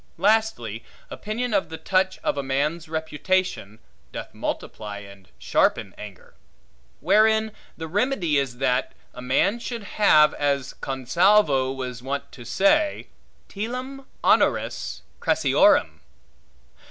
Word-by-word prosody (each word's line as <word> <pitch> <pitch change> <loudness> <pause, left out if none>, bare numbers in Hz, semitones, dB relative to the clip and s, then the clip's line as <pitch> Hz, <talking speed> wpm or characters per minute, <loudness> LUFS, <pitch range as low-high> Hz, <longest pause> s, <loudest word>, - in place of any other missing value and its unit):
Lastly, 200 - +1 0.3
opinion 225 +3 -3
of 200 - +1
the 160 - -6
touch 185 +1 0
of - - 0
a 140 - -2
man's 150 +5 -2
reputation, 160 - -2 0.3
doth - - -7
multiply 105 -2 -5
and 100 -2 -13
sharpen 95 - +1
anger. 105 -3 -12 0.7
Wherein 220 +4 +3 0.3
the 160 - -6
remedy 185 - +1
is, 130 -3 -3
that 125 -1 0 0.2
a 125 - -9
man 130 - +1
should 235 -2 -5
have, 155 -7 +4
as 140 -2 -1
Consalvo 135 +1 +2
was 125 -3 -6
wont 140 +2 -4
to 120 - -11
say, 200 - +1 0.4
telam 255 +6 -6 0.2
honoris - - +1 0.2
crassiorem. - - +3
160 Hz, 115 wpm, -24 LUFS, 130-210 Hz, 0.7 s, have